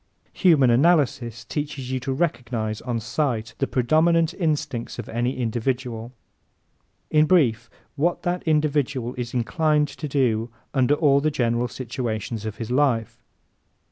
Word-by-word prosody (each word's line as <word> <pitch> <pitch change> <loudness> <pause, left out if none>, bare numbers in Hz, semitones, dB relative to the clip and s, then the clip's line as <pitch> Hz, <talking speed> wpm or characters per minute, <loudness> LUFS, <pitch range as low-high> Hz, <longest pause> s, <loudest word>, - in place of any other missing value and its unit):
¶ - - -22
Human 150 -10 +5
Analysis 130 -5 +2
teaches 140 -2 -4
you 130 - -1
to 130 +2 -4
recognize, 120 -8 -2
on 120 -2 -2
sight, 120 -1 -2
the 135 - +1
predominant 160 +6 +2
instincts 150 -8 -2
of 120 - -6
any 120 +3 -2
individual 120 0 -2 1.0
in 155 0 +4
brief, 120 -9 +3 0.3
what 170 +4 0
that 180 0 -1
individual 145 -5 +1
is 125 -1 -5
inclined 150 +4 +1
to 150 - -6
do 120 -5 +1 0.2
under 135 +1 +3
all 140 -2 +3
the 155 - +2
general 120 -4 0
situations 115 -3 -4
of 105 - -5
his 115 0 -5
life. 125 -5 +1
130 Hz, 140 wpm, -24 LUFS, 120-150 Hz, 1.0 s, Human